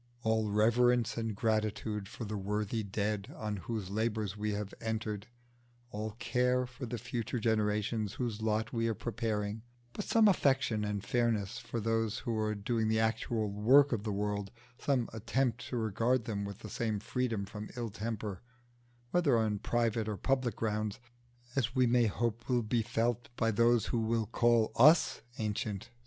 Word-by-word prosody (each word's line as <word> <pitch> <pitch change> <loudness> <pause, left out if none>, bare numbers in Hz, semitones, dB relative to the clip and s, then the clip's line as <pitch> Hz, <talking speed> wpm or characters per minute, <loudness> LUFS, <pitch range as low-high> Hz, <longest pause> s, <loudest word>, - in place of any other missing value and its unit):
All 110 -1 +1
reverence 120 +3 +3
and 115 -2 -2
gratitude 110 -1 -1
for 110 +2 -7
the 105 0 -4
worthy 105 +2 -1
Dead 105 0 -2
on 105 -1 -3
whose 100 -1 -4
labours 110 -2 -1
we 105 0 -2
have 105 -1 -4
entered, 110 -2 -3 0.6
all 105 0 -4
care 125 +1 +1
for 125 +1 -7
the 120 +1 -3
future 120 +1 -3
generations 105 -1 0
whose 115 -3 -3
lot 110 0 0
we 115 -1 +1
are 115 - 0
preparing; 105 0 -2 0.3
but 210 - -3
some 225 +1 +4
affection 135 - +2
and 105 -1 -2
fairness 115 -2 0
for 120 -1 -4
those 115 0 0
who 115 -1 -2
are 105 0 0
doing 110 +2 0
the 110 0 +2
actual 110 -1 0
work 130 +8 +5
of 115 -5 0
the 105 0 -3
world, 100 0 -2 0.3
some 130 -5 +1
attempt 120 +2 -1
to 125 - -3
regard 115 +2 +1
them 100 -2 -2
with 100 0 -7
the 110 - -7
same 110 -3 -1
freedom 115 -2 -1
from 105 +1 -7
ill 115 -3 -3
temper, 105 -3 -4 0.7
whether 155 -9 +3
on 110 -2 +1
private 115 -1 0
or 105 - -3
public 130 +3 0
grounds, 105 -2 -2 0.6
as 125 -1 0
we 130 -1 +4
may 120 -1 +4
hope 115 +3 -2
will 120 -2 +2
be 115 +2 +1
felt 120 +1 -1
by 115 -2 +1
those 115 +1 +4
who 120 - 0
will 115 0 +1
call 115 0 +3
us 155 +7 +6 0.2
ancient! 105 0 -3
110 Hz, 170 wpm, -32 LUFS, 105-120 Hz, 0.7 s, us